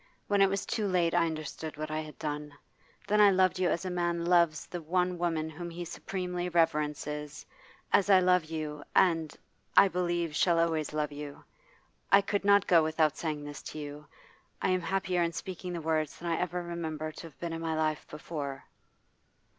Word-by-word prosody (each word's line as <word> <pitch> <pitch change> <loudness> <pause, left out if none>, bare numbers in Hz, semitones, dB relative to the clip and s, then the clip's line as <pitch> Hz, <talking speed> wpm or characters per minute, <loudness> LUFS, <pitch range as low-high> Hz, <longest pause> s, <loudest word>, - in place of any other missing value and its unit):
When 200 -1 +3
it 195 - +6
was 195 0 -2
too 215 -3 -1
late 175 -3 +2
I 170 -1 +3
understood 155 0 -5
what 155 0 -4
I 155 - -1
had 155 -1 -8
done. 150 -1 -4 0.5
Then 210 +1 +4
I 205 - +8
loved 185 -1 +3
you 180 -2 +2
as 170 - -1
a 185 - -2
man 175 -1 -1
loves 170 -3 +3
the 175 - -6
one 180 +2 0
woman 165 -2 0
whom 170 +2 -7
he 175 +1 -6
supremely 180 0 -4
reverences, 150 -3 -1 0.5
as 200 0 +4
I 190 -2 +8
love 180 -2 +3
you, 155 -2 -5
and, 165 -4 +3 0.4
I 195 - +9
believe, 175 -3 -1
shall 170 0 +3
always 160 -3 +1
love 150 -1 -1
you. 145 0 -8 0.7
I 200 - +8
could 200 0 -1
not 200 0 +5
go 170 -2 +6
without 155 -1 +2
saying 155 -3 -3
this 145 -1 -7
to - - -8
you. 150 0 -7 0.5
I - - 0
am 185 0 +2
happier 180 +1 0
in 170 0 0
speaking 180 0 -6
the 170 - -4
words 155 -1 -1
than 170 0 -3
I 165 - +1
ever 180 0 -2
remember 160 -2 -4
to 165 - -9
have 155 - -18
been 170 -1 -4
in 165 - -4
my 165 -1 -1
life 155 -1 -1
before. 150 -3 -5
165 Hz, 195 wpm, -30 LUFS, 155-180 Hz, 0.7 s, I